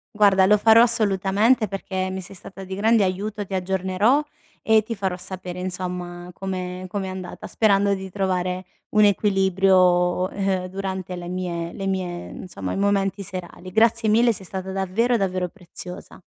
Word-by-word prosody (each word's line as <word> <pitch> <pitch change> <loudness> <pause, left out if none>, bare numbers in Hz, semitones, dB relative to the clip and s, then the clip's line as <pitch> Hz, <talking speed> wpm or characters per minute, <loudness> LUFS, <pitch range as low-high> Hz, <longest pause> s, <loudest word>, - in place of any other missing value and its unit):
Guarda, 200 -2 +5
lo 210 +2 +5
farò 225 +2 +6
assolutamente 215 0 +3
perché 190 -1 -3
mi 190 - -4
sei 190 +1 -10
stata 190 +1 -10
di 190 0 -5
grande 220 +1 +3
aiuto. 205 +3 -3
Ti 195 - -9
aggiornerò, 190 +7 +1 0.4
e 220 -1 +4
ti 230 - -4
farò 195 -4 -2
sapere 185 -1 -7
insomma 180 -1 -5
come 185 -1 -5
com'è 195 0 -3
andata, 185 -1 -7
sperando 200 -2 +3
di 190 0 -7
trovare 185 -1 -1 0.2
un 210 0 +5
equilibrio, 190 -3 +3
ehm, 195 -2 -1
durante 190 -1 -4
le 175 0 -7
mie 175 -2 -3
le 195 -1 -4
mie 180 -2 -3
insomma, 100 - -6
i - - -3
momenti 200 0 +1
serali. 185 -1 -8
Grazie 225 +1 +3
mille, 230 +2 +4
sei 195 - -7
stata 190 +1 -5
davvero 195 +6 +1
davvero 185 -4 0
preziosa. 180 +1 -10
190 Hz, 160 wpm, -23 LUFS, 185-205 Hz, 0.4 s, farò